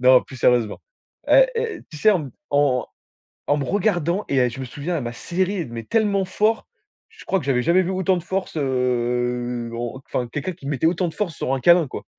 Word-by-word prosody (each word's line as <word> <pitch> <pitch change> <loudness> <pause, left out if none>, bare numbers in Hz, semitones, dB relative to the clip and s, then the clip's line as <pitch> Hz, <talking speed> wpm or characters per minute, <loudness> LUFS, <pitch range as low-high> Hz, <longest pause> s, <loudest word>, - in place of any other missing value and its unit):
Non 130 0 +6
plus 130 - -11
sérieusement, 120 -3 +2 0.5
hé, - - +7
hé 460 -1 -2
tu 155 - -9
sais? 215 - +5
En 185 -5 +2
m 135 - -8 0.2
en 140 -4 +2 0.6
en 145 - +3
me 140 - -2
regardant 185 -1 0
et 140 - 0
elle 125 -1 +3
je 125 - -8
me 130 - -3
souviens 150 +7 -4
elle 140 - -2
m'a 120 - -4
serré, 185 +6 -2
mais 115 -1 -6
tellement 205 - +1
fort. 215 +4 0 0.4
Je 445 - -15
crois 195 - +1
que 170 - -6
j'avais 130 -2 +1
jamais 175 +5 +4
vu 185 - -2
autant 190 0 +1
de 175 - -4
force, 190 -2 -3
heu, 125 -2 -1
en 120 +3 -5
enfin 125 - -2
quelqu'un 145 +9 -3
qui 155 -5 -13
mettait 145 +2 0
autant 175 +1 +1
de - - -8
force 180 -7 -2
sur 130 - -2
un 135 - -3
câlin 170 +3 +5
quoi - - -7
145 Hz, 225 wpm, -22 LUFS, 125-185 Hz, 0.6 s, hé